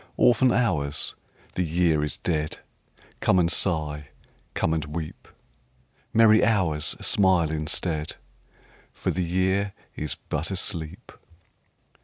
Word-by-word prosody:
Orphan 125 +1 +4
Hours, 80 - 0 0.4
the - - -1
Year 85 -2 +1
is 75 - -3
dead, 75 -3 -2 0.6
Come 95 - +3
and 85 -1 +3
sigh, 75 -5 0 0.5
come 80 - +1
and 80 -2 -1
weep! 75 +1 -7 0.8
Merry 110 -1 +5
Hours, 90 -9 +2
smile 95 -5 +4
instead, 80 0 -2 0.8
For - - -2
the 90 - -1
Year 95 +3 0 0.2
is 75 - -4
but 75 +2 -2
asleep. 85 -4 -3
85 Hz, 110 wpm, -25 LUFS, 75-95 Hz, 0.8 s, Merry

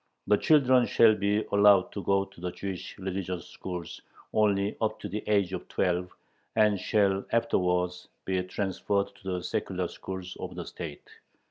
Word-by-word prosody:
The 105 - +4
children 130 -4 +4
shall 115 -2 +6
be 105 +1 0
allowed 100 -2 +5
to 100 - -5
go 100 +1 +2
to 95 -3 -17
the 90 - -2
Jewish 95 -1 -6
religious 95 -2 -4
schools 90 -2 -7 0.3
only 100 -1 +2
up 110 -1 0
to - - -4
the 105 - -4
age 100 -3 +2
of 90 - -5
twelve, 90 0 0 0.5
and 105 -3 +4
shall 100 -1 +2
afterwards 90 -6 +1 0.2
be 95 -1 0
transferred 100 +1 -1
to 95 -2 -3
the 90 -1 -3
secular - - -2
schools 95 -1 -7
of - - -6
the - - -5
state. 80 -5 -8
95 Hz, 160 wpm, -28 LUFS, 90-105 Hz, 0.5 s, shall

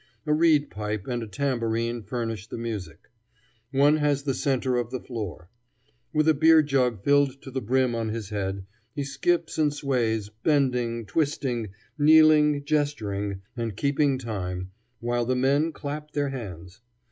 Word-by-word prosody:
A 150 - +2
reed 155 -2 +3
pipe 105 -1 -4
and 120 -2 -2
a 115 - -5
tambourine 115 -2 -1
furnish 115 -1 -4
the - - -6
music. 110 -6 -6 0.6
One 145 +3 +4
has 145 -2 +1
the 135 -2 0
center 130 -2 0
of 120 -2 -1
the 130 0 -4
floor. 105 -9 -6 0.6
With 155 -1 +2
a 160 - +6
beer 160 +1 +6
jug 125 -7 0
filled 140 -1 +3
to 135 - -9
the 130 0 -3
brim 125 +2 +1
on 115 -1 -2
his 110 -2 -4
head, 95 -2 -3 0.3
he 145 - -2
skips 160 +5 -1
and 150 -1 +3
sways, 120 -7 -1
bending, 125 -6 +1
twisting, 125 -2 -1 0.3
kneeling, 150 -1 +5
gesturing, 105 -10 -1
and 115 -4 -4
keeping 140 0 +2
time, 95 -6 -4 0.3
while 120 0 0
the 130 +2 0
men 140 +5 +2
clap 150 0 -6
their 145 -1 0
hands. 95 -6 -8
130 Hz, 155 wpm, -26 LUFS, 110-145 Hz, 0.6 s, a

